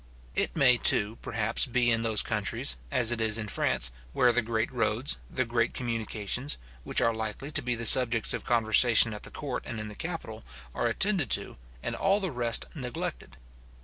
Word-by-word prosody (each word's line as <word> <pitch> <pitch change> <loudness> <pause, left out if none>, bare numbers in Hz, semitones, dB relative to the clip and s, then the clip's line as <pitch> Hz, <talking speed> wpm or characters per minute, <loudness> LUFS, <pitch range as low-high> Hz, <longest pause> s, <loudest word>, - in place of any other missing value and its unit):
It - - 0
may 130 -6 +4
too, 110 -1 +2
perhaps, 110 +1 -1
be 120 -1 +1
in 115 -1 +1
those 110 -2 0
countries, - - -2
as 120 - +2
it 120 -1 -2
is 110 -1 +3
in 110 -2 -5
France, 65 -9 0 0.2
where 125 -1 +3
the 125 +1 0
great 115 +1 -3
roads, 120 +1 -1
the 130 - -2
great 115 0 -2
communications, 115 +2 -3 0.3
which - - -1
are 115 - +1
likely 110 +6 -6
to 145 - +3
be 125 -2 -2
the 115 0 -2
subjects 115 -1 +7
of - - -5
conversation 115 0 +4
at 105 - -9
the - - -9
court 135 -4 -6
and 115 - -6
in 110 0 -7
the 105 - -11
capital, - - -7 0.3
are 120 - -2
attended 175 - +2
to, - - -11 0.3
and - - -4
all 195 +1 +1
the 190 -4 -4
rest 120 -3 0
neglected. 125 - -7
115 Hz, 190 wpm, -27 LUFS, 110-125 Hz, 0.3 s, subjects